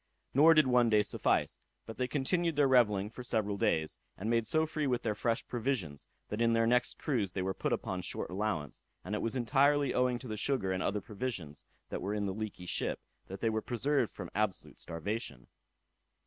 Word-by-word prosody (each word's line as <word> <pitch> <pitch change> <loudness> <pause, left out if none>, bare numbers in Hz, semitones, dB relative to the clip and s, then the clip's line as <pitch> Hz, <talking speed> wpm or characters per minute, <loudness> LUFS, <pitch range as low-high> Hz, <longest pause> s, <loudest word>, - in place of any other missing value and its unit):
Nor 160 +5 +7
did 155 -1 +6
one 125 -2 +4
day 105 -1 +4
suffice, - - 0 0.3
but 115 - -8
they 125 - 0
continued 160 +5 0
their 145 -1 +4
revelling 105 -6 +3
for 125 - -8
several 110 -4 0
days, 80 -5 0 0.2
and 110 +4 -2
made 115 -1 +2
so 155 +4 +2
free 155 -2 -2
with 125 -2 0
their 110 - 0
fresh 115 +3 -1
provisions, 115 - -2 0.2
that 105 +2 -3
in 115 0 +4
their 115 0 +3
next 125 +1 +2
cruise 110 -11 -1
they 95 - -1
were 95 +1 -1
put - - -2
upon - - -2
short - - -4
allowance; 95 -7 -2 0.2
and 100 - -4
it 105 - -1
was 115 +2 -1
entirely 140 +3 +3
owing 125 -1 +2
to 125 - -9
the 110 -2 -4
sugar 105 -5 0
and 95 0 -1
other 105 +1 0
provisions 95 - -5 0.3
that - - -3
were 100 +3 -2
in 105 -1 -1
the 95 - -2
leaky 105 -3 -5
ship - - -2 0.3
that 95 +1 -8
they 115 - +2
were 110 0 -1
preserved 125 +1 0
from - - -8
absolute 105 -2 -2
starvation. 85 - -4
115 Hz, 205 wpm, -32 LUFS, 100-125 Hz, 0.3 s, Nor